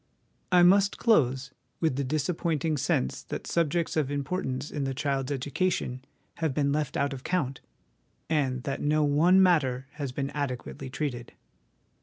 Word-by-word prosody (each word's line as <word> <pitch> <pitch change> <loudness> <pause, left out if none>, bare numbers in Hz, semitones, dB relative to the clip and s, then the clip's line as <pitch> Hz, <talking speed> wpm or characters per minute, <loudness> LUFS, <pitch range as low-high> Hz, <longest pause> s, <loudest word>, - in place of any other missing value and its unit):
I 180 -1 +6
must 200 +3 +5
close, 135 - +2 0.3
with 160 -6 +1
the 140 - -1
disappointing 155 +2 -1
sense 65 - 0
that - - -5
subjects 170 0 0
of 150 -4 +1
importance 140 -2 -3
in 145 - -2
the 135 -1 -2
child's 135 -1 -1
education 140 -1 -1 0.3
have 160 -5 -1
been 140 -2 +2
left 150 -1 -1
out 140 0 0
of 130 - -8
count, 140 -8 -1 0.7
and 135 -5 0
that 140 -1 -3
no 150 +1 +2
one 165 +6 +5
matter 135 -8 +2
has 140 -3 -5
been 135 +2 -3
adequately 135 -1 -4
treated. 125 -3 -4
145 Hz, 150 wpm, -28 LUFS, 135-160 Hz, 0.7 s, I